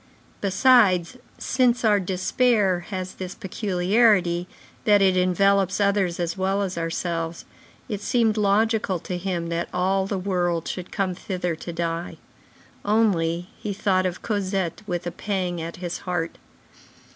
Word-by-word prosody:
Besides, 200 -2 +4 0.2
since 250 -2 +1
our 210 -2 +4
despair 190 +1 +1
has 185 -2 -4
this 185 0 -7
peculiarity, 190 -2 +2 0.4
that 205 -1 +5
it 190 -2 +4
envelops 190 +1 +2
others 200 -4 +1
as 170 -1 -1
well 195 +1 0
as 190 -2 -3
ourselves, 165 0 -3 0.4
it 210 -5 -4
seemed 225 0 +2
logical 210 -1 +2
to 180 +2 -5
him 175 -2 -3
that 170 0 -2
all 190 +1 +1
the 195 - -2
world 175 -3 -1
should 180 -1 -5
come 195 -3 -1
thither 180 -2 -3
to 170 - -7
die. 170 0 -3 0.7
Only, 180 -5 +1
he 210 - -3
thought 190 -2 +1
of 180 0 -6
Cosette 195 -4 -2
with 175 -2 -3
a 175 - -2
pang 180 -4 -2
at 165 +1 -6
his 175 -1 -5
heart. 175 -2 -3
185 Hz, 140 wpm, -24 LUFS, 175-205 Hz, 0.7 s, that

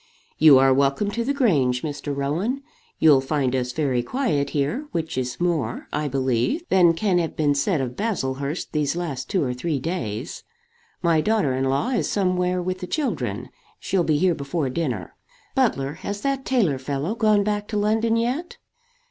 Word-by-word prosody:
"You 155 -4 +8
are 135 0 +5
welcome 140 +9 +1
to 235 +3 -2
the 265 - 0
Grange, 145 - +2
Mr. 145 -2 -4
Rowan. 180 - -1 0.3
You'll 150 -4 +6
find 135 -2 0
us 125 -1 -1
very 130 -3 0
quiet 145 - -1
here; 155 - -1
which 160 -5 -3
is 125 -1 -3
more, 165 -10 -1
I 150 0 -1
believe, 130 - 0
than 175 -3 +5
can 185 0 +1
have 165 -2 -2
been 145 -2 +2
said 140 +2 +1
of 125 -2 -4
Baslehurst 140 - -2
these 150 0 0
last 145 -7 -4
two 190 - +1
or 125 -2 -1
three 145 +4 -2
days. 130 - -4 0.6
My 165 -2 +3
daughter 210 -8 +1
in 130 +1 0
law 135 - 0
is 250 -4 0
somewhere 180 -2 0
with 185 +1 -3
the 180 - -6
children. 295 - -2 0.3
She'll 190 -3 0
be 155 -2 +2
here 180 +3 +3
before 140 -1 -2
dinner. 125 - -3 0.4
Butler, 135 +1 +1
has 205 +1 -4
that 275 +1 -1
tailor 195 - +1
fellow 140 +7 -2
gone 215 -3 +3
back 205 0 -2
to 210 - -3
London 225 +2 +2
yet?" 275 - -2
160 Hz, 175 wpm, -23 LUFS, 135-205 Hz, 0.6 s, You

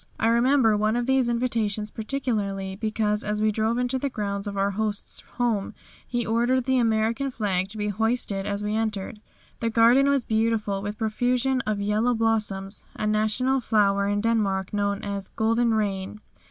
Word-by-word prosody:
I 225 - +2
remember 235 -1 +4
one 215 +2 +1
of 240 0 0
these 265 -1 +2
invitations 225 -3 -1
particularly 210 -6 -3
because 215 0 -1
as 210 0 -2
we 215 0 +2
drove 220 +2 0
into 250 +1 0
the 280 - -1
grounds 200 -3 -3
of 200 -1 -4
our 200 +1 +1
host's 210 0 -3 0.2
home 230 -5 0 0.3
he 240 -1 -2
ordered 240 +3 +1
the 260 -1 +2
American 230 +3 +1
flag 195 -6 -1
to 215 - -9
be 210 0 -1
hoisted 210 -2 -1
as 205 0 -2
we 210 0 -1
entered. 215 -1 -2 0.4
The 230 - 0
garden 240 +5 +5
was 275 -3 +1
beautiful 220 -3 0
with 205 +1 -4
a - - -35
profusion 250 +4 0
of 210 -1 -1
yellow 215 +4 +1
blossoms, 215 -3 0
a 215 - -3
national 215 +5 +1
flower 200 -4 +2
in 205 0 0
Denmark 205 -4 0
known 200 -1 -1
as 200 -1 -4
"Golden 230 +1 +2
Rain." 200 -1 -2
220 Hz, 175 wpm, -25 LUFS, 205-235 Hz, 0.4 s, garden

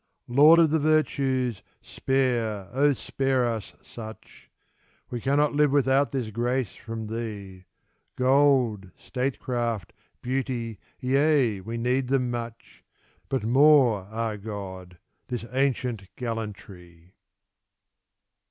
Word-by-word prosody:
Lord 145 +7 +7
of 165 -3 +5
the 160 - +2
virtues, 135 -7 +1 0.2
spare, 125 -1 0
spare 135 0 0
us 115 -3 -4
such! 110 -1 -11 0.6
We 120 -1 -4
cannot 145 +3 +2
live 150 0 +3
without 135 0 +2
this 125 -5 -3
grace 120 +1 -1
from 115 -2 -7
thee; 105 -4 -6 0.5
Gold, 130 -7 +3
statecraft, 120 -5 -3 0.3
beauty 125 -4 -3
— - - -34
^yea, 135 -5 +2
we 115 +3 -5
need 125 +2 0
them 130 -2 +1
much, 115 -1 -7 0.5
But 135 -5 -1
more 125 -5 +4
— - - -19
^ah, 110 -2 -3
God! 95 -4 -7 0.2
— - - -48
^this 120 -2 -4
ancient 125 -6 -1
gallantry! 100 -7 -7
120 Hz, 110 wpm, -26 LUFS, 110-135 Hz, 0.6 s, Lord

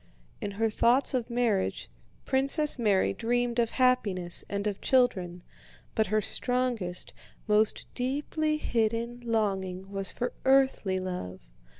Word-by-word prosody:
In 205 - -3
her 225 0 +1
thoughts 245 +6 +3
of 250 -2 -1
marriage 235 -5 0 0.4
Princess 275 +2 +3
Mary 205 -5 +2
dreamed 240 +1 -1
of 230 -1 +2
happiness 210 -10 +1
and 200 0 -3
of 205 -2 -2
children, 185 -9 +1 0.5
but 220 - +1
her 215 0 +1
strongest, 245 -8 -1 0.3
most 215 0 +2
deeply 295 +4 -1
hidden 235 -2 -1
longing 195 -4 -2
was 195 -1 -1
for 245 - -3
earthly 265 -8 +3
love. 180 - -5
225 Hz, 120 wpm, -28 LUFS, 195-250 Hz, 0.5 s, thoughts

